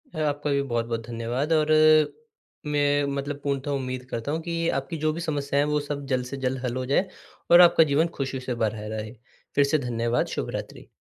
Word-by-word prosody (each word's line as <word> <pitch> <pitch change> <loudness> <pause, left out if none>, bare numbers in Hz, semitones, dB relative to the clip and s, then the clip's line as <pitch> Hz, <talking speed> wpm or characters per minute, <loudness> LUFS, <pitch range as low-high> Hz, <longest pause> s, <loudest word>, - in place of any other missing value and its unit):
ह 155 - -2
आपका 145 +1 -3
भी 140 0 +2
बहुत-बहुत 115 -3 -2
धन्यवाद 120 +6 -3
और 155 -1 +2 1.0
मैं 145 0 +2
मतलब 140 +1 -4
पूर्णतः 140 0 -2
उम्मीद 130 -2 -3
करता 115 +4 -3
हूँ 160 +2 -2
कि 170 0 -4 0.2
आपकी 135 +5 -6
जो 155 0 +1
भी 170 - -5
समस्याएँ 145 -3 0
हैं, - - -2
वो 150 - +2
सब 145 -1 -5
जल्द 130 -2 0
से 135 +2 -6
जल्द 130 +1 0
हल 120 -1 -2
हो 130 - -2
जाएँ। 140 +9 +1 0.4
और 175 +1 +10
आपका 170 -2 +7
जीवन 155 +2 +2
ख़ुशी 135 -1 -2
से 125 -1 -4
भरा 110 -2 -2
रहे। 110 0 -5 0.4
फ़िर 140 - +5
से 145 +2 +2
धन्यवाद, 120 0 0
शुभरात्रि। - - -5
140 Hz, 200 wpm, -25 LUFS, 125-150 Hz, 1.0 s, और